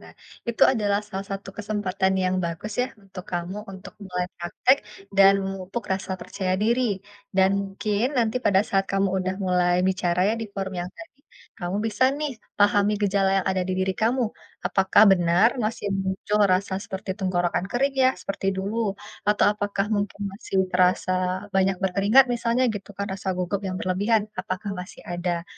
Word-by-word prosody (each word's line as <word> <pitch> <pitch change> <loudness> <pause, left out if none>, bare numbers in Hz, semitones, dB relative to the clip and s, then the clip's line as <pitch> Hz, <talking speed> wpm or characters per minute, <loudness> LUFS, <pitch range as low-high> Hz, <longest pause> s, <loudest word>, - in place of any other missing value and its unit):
nah - - -14 0.4
itu 235 - 0
adalah 205 -4 +1
salah 195 -1 -5
satu 195 0 -6
kesempatan 200 -2 0
yang 185 0 +1
bagus 170 +6 -4
ya 255 - -2 0.2
untuk 185 -2 -9
kamu 175 +2 -3 0.2
untuk 190 - -10
mulai 180 -1 -2 0.2
praktek 210 +9 +3 0.4
dan 195 0 +8
memupuk 195 +4 -5
rasa 190 0 -3
percaya 185 +1 -2
diri 235 +3 +2 0.5
dan 190 0 +5
mungkin 200 +2 -2
nanti 230 +1 +1
pada 195 -5 +4
saat 195 0 +2
kamu 195 0 +2
udah 185 +1 -2
mulai 180 -1 +2
bicara 180 -1 0
ya 220 - +2
di 225 - -3
forum 195 -1 -3
yang 175 - -4
tadi, 330 -4 -13 0.4
kamu 175 +2 -2
bisa 220 +3 -1 0.2
nih 300 -2 -2 0.3
pahami 205 0 +4
gejala 195 -1 +2
yang 185 - -8
ada 185 - 0
di 185 - 0
diri 190 0 +1
kamu 245 +2 +2 0.4
apakah 190 +1 +4
benar 175 +4 +4 0.2
masih 215 -1 -3
muncul 195 +2 -1
rasa 190 +1 0
seperti 195 -2 -6
tenggorokan 175 -2 0
kering 275 +3 +1
ya 260 - +6
seperti 195 0 -4
dulu 195 +3 -3 0.5
atau 210 - +4
apakah 205 -1 -2
mungkin 205 0 -2
masih 195 -1 -5 0.2
terasa 185 0 +3 0.4
banyak 190 0 +3
berkeringat 200 +7 +5
misalnya 235 +2 +1
gitu 200 0 -7
kan 200 - -2
rasa 190 0 -5
gugup 185 +2 -1
yang 185 -1 -3
berlebihan 205 +4 +1 0.2
apakah 185 +2 -4
masih 180 - -10
ada. 175 -1 -2
195 Hz, 165 wpm, -25 LUFS, 185-210 Hz, 0.5 s, dan